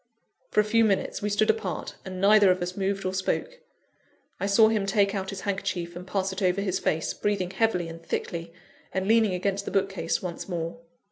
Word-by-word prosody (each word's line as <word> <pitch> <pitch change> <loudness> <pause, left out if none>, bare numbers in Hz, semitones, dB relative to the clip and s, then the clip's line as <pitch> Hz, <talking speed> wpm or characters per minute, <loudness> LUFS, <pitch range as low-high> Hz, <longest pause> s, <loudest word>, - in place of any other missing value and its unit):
For - - +1
a - - +6
few 225 +2 +3
minutes 200 -3 0
we 210 - -1
stood 210 +1 +3
apart, 450 - -4
and 185 -1 -6
neither 205 0 +6
of 185 0 +3
us 180 +1 -4
moved 195 0 -1
or 185 - -1
spoke. - - -2 0.8
I 200 - -1
saw 220 +2 +6
him 210 -3 0
take 200 0 +2
out 190 -2 -3
his 195 - -5
handkerchief, 190 -4 -3
and 180 +1 -8
pass 190 0 -1
it 190 - -5
over 185 0 +2
his 195 -2 -1
face, 160 0 0
breathing 200 -3 -1
heavily 190 -4 +1
and 165 0 -9
thickly, 165 0 -4 0.4
and 190 0 -2
leaning 220 -3 +4
against 195 +2 -1
the - - -3
bookcase 195 0 0
once 180 +1 -6
more. 170 +4 -3
195 Hz, 205 wpm, -27 LUFS, 180-205 Hz, 0.8 s, a